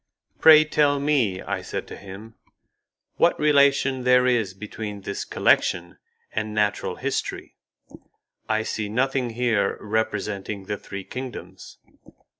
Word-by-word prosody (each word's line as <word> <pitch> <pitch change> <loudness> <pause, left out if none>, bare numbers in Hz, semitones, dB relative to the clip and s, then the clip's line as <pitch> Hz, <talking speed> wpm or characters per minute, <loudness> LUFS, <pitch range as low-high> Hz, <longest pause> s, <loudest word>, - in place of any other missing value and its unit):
"Pray, 155 -1 +8
tell 145 -2 +2
me," 130 -10 +1
I - - -3
said - - -5
to - - -7
him, 100 +3 -11 0.8
"what - - +3
relation 140 -3 +3
there 125 0 +4
is 115 -7 +1
between 105 0 -7
this 100 +1 -4
collection 85 0 +1 0.3
and 110 0 -3
natural 105 -1 0
history? - - -4 0.9
I 110 0 +1
see 110 -1 -3
nothing 130 +2 0
here 115 -4 0
representing 105 -2 -3
the 105 - -3
three 95 0 -8
kingdoms." 130 +4 -8
110 Hz, 120 wpm, -24 LUFS, 100-130 Hz, 0.9 s, Pray